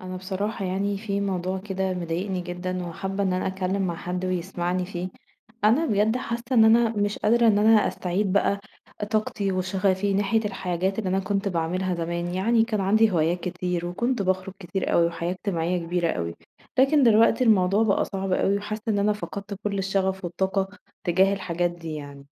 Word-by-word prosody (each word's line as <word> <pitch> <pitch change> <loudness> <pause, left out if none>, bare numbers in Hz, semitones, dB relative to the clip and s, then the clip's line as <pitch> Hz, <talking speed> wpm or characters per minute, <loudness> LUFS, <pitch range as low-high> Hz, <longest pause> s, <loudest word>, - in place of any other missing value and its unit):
أنا 185 0 -6
بصراحة 195 +2 -3
يعني 195 +2 -1
في 200 -2 -2
موضوع 190 -1 -1
كده 190 -1 -2
مضايقني 180 +2 -2
جدًا 180 +1 -4
وحابّة 190 +4 -3
إن 190 -2 +1
أنا 185 - -1
أتكلّم 190 +1 -1
مع 170 - -3
حد 180 +2 -4
ويسمعني 180 0 -1
فيه، 180 -1 -4 0.6
أنا 245 +10 +4
بجد 215 0 +2
حاسّة 235 -2 -3
إن 225 -3 +6
أنا 230 +1 +5
مش 205 -1 -1
قادرة 235 +2 +3
إن 210 -2 +5
أنا 215 0 +5
أستعيد 185 +2 -1
بقى، 200 0 +2 0.5
طاقتي 210 -2 0
وشغفي 190 +1 0
ناحية 205 +3 +2
الحاجات 190 -1 -2
اللي 205 -4 -1
أنا 190 - +2
كنت 200 +1 -1
باعملها 180 +1 -1
زمان، 170 +1 -3
يعني 225 +4 +3
كان 220 -3 -2
عندي 215 +3 +4
هوايات 170 +1 +1
كتير 180 -1 -3
وكنت 225 +6 -1
باخرج 185 0 -1
كتير 190 +1 -3
أوي 170 - +4
وحياة 170 +1 -3
اجتماعيّة 180 -2 -1
كبيرة 175 0 0
أوي، 85 0 -3 0.4
لكن 275 +3 +5
دلوقتي 230 +1 +5
الموضوع 200 -2 +4
بقى 210 -3 +2
صعب 195 -1 -3
أوي 195 +2 +2
وحاسّة 215 +1 -5
إن 210 -2 +2
أنا 205 +1 +3
فقدت 200 -1 -6
كلّ 200 -1 -1
الشغف 190 -1 -1
والطاقة، 190 +2 -1 0.4
تجاه 190 +3 +4
الحاجات 175 -3 -1
دي 165 -2 -7
يعني. 140 -2 -9
190 Hz, 175 wpm, -25 LUFS, 180-205 Hz, 0.6 s, إن